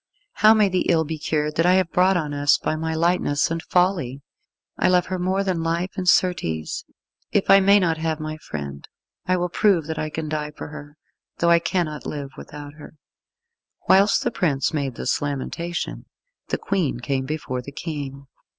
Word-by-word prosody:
How 215 +1 +7
may 210 -2 +4
the 185 -1 0
ill 165 -2 +4
be 160 0 -5
cured 150 0 -1
that 165 - +3
I 180 - +5
have 185 -2 +2
brought 185 +1 +3
on 150 -4 -2
us 145 0 +3
by - - -2
my 160 +1 -2
lightness 165 -3 +1
and 165 0 -2
folly! 170 -8 0 0.5
I - - +1
love 180 -1 +3
her 185 0 -3
more 190 +2 0
than 185 -4 -1
life, 170 +3 -1
and, 180 -1 +1
certes, 130 - +1 0.5
if 200 - +2
I 195 - +9
may 200 +1 +5
not 165 -4 0
have 160 -1 -1
my 155 0 -5
friend 70 - -7 0.4
I 185 0 +2
will 180 0 0
prove 180 -3 +2
that 160 0 -4
I 155 - -2
can 155 0 -4
die 150 -1 -3
for - - -7
her, 145 0 -11 0.4
though 170 0 +3
I 170 - +6
cannot 165 -4 -2
live 140 -2 -5
without 145 -1 -10
her." 150 - -12 0.9
Whilst 195 +2 +5
the - - 0
prince 145 -3 0
made 140 -5 -2
this 125 - -1
lamentation, 145 +4 -4 0.4
the - - -1
Queen 175 -11 -1
came 130 +1 -2
before 135 -4 -3
the 140 - -9
King. 140 -3 -6
160 Hz, 190 wpm, -23 LUFS, 145-180 Hz, 0.9 s, I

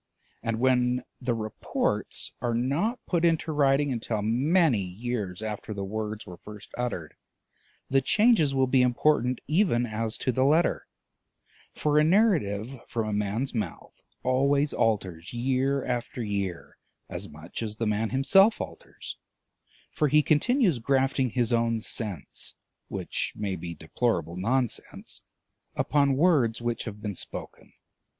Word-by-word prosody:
And 115 -1 -2
when 125 -1 +2 0.2
the 120 -2 0
reports 110 -2 -2
are 120 -1 0
not 145 - 0
put 175 -2 0
into 165 -1 +2
writing 140 -1 +3
until 115 -3 -2
many 135 - +3
years 100 0 -4
after 105 0 -5
the 100 - -3
words 105 +1 -4
were 90 -4 -10
first 105 +2 -12
uttered, 115 -11 -3 0.7
the 135 0 +3
changes 200 - +4
will 130 0 +4
be 130 0 +3
important 125 0 +2
even 155 - +2
as 110 0 -2
to 130 - 0
the 130 +2 +1
letter; 155 +5 +2 0.9
for 150 0 +2
a - - +5
narrative 140 - +2
from 115 -2 -2
a - - -2
man's 105 +6 -1
mouth 105 -8 -4 0.3
always 140 +3 +2
alters 95 -5 -1
year 130 +3 0
after 120 0 -3
year 100 -4 -4 0.3
as - - -5
much 80 +7 -8
as 110 -2 -3
the 115 - -2
man 105 +1 0
himself 195 - +5
alters, - - -8 0.7
for 150 - +1
he 150 +2 +4
continues 180 - +3
grafting 135 +1 +1
his 120 0 0
own 115 -1 +2
sense 105 - -3 0.3
(which - - -3
may 100 -3 -2
be 85 -1 -6
deplorable 85 -1 -1
nonsense) 120 +6 -2 0.5
upon 140 -2 +2
words 140 -9 +3
which 120 -1 -2
have 105 -1 -7
been 105 -2 -2
spoken. - - -7
120 Hz, 140 wpm, -27 LUFS, 105-140 Hz, 0.9 s, a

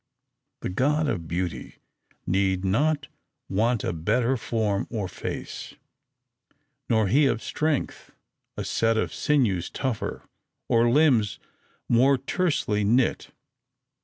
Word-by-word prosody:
The - - -3
god 145 +10 +1
of 85 - -2
Beauty 85 -5 -4 0.5
need 95 0 +1
not 150 +9 +1 0.4
want 110 +3 +1
a - - -1
better 115 +10 +1
form 110 -4 -1
or 105 -5 -3
face; - - -6 1.1
nor 110 -2 +3
he 140 +8 +4
of 115 -4 -1
Strength 155 -3 -2 0.5
a - - -3
set 115 0 +1
of - - -1
sinews 115 - +1
tougher, 115 -6 -3 0.4
or 115 0 +3
limbs 125 -6 +3 0.5
more 130 +4 +4
tersely 135 - 0
knit. 120 +5 +1
115 Hz, 110 wpm, -25 LUFS, 100-135 Hz, 1.1 s, he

